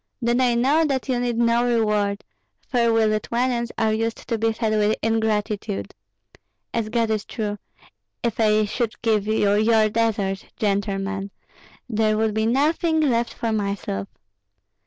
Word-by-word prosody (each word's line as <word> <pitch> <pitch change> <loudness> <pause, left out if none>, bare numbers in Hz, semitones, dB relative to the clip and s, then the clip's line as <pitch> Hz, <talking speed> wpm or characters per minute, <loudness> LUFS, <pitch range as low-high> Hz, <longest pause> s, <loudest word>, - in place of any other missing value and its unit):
"Then 240 0 +1
I 245 -2 +3
know 275 +7 +3
that 275 -4 -1
you 250 -2 +1
need 240 -1 -1
no 235 0 +3
reward, 210 -4 +1 0.4
for 235 -2 +2
we 225 -1 +3
Lithuanians 235 +3 0
are 220 -1 +2
used 225 +1 -3
to 230 - -1
be 225 +1 +2
fed 220 -1 -1
with 215 0 +2
ingratitude. 210 - -1 0.8
As 225 -2 -1
God 230 -1 0
is 215 -1 0
true, 210 -3 -4 0.6
if 235 -2 -1
I 215 -1 +3
should 225 +2 -3
give 215 -3 +1
you 210 -2 +2
your 215 +1 +3
deserts, 210 -3 -1
gentlemen, 200 -1 -1 0.6
there 215 -2 +1
would 220 -1 +1
be 220 +1 +1
nothing 315 +6 +2
left 240 -6 +1
for 230 - -2
myself. 200 - -2
220 Hz, 150 wpm, -23 LUFS, 210-235 Hz, 0.8 s, I